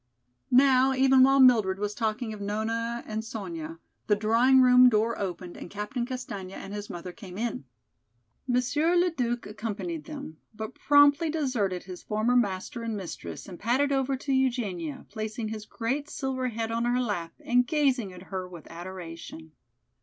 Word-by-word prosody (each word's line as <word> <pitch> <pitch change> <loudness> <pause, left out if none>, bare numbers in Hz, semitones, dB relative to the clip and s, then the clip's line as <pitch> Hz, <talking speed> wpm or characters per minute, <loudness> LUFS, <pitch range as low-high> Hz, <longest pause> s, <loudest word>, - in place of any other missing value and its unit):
Now, 260 0 +5
even 265 0 +5
while 270 +1 +6
Mildred 220 -8 +5
was 205 +1 -2
talking 220 +1 -2
of 210 - -8
Nona 225 +3 -2
and 220 0 -4
Sonya, 170 -8 -6 0.3
the 210 - +4
drawing 230 +5 +4
room 250 0 +7
door 225 0 +1
opened 180 -2 -4
and - - -9
Captain 210 +5 -3
Castaigne 205 -8 -6
and 195 - -8
his 205 0 -6
mother 175 +1 -6
came 185 -2 -10
in. 225 - -3 0.8
Monsieur 265 +7 +2
Le 355 0 +3
Duc 240 -5 -2
accompanied 230 +10 -5
them, 280 - -8 0.2
but 220 +3 -6
promptly 290 +2 +5
deserted 245 - -1
his 180 -1 -9
former 215 +4 0
master 235 +2 0
and 225 -2 -3
mistress 185 -4 -7
and 180 -3 -9
padded 260 +6 +1
over 270 0 +1
to 275 +1 -2
Eugenia, 225 - -1
placing 215 0 -4
his 215 -1 -6
great 265 +5 -3
silver 260 -2 -2
head 225 -1 -3
on 230 +1 0
her 245 +1 +2
lap 200 -9 -2
and 245 0 +2
gazing 275 - +1
at 180 0 -11
her 185 -1 -3
with 175 -3 -11
adoration. 165 -2 -8
230 Hz, 165 wpm, -28 LUFS, 200-260 Hz, 0.8 s, room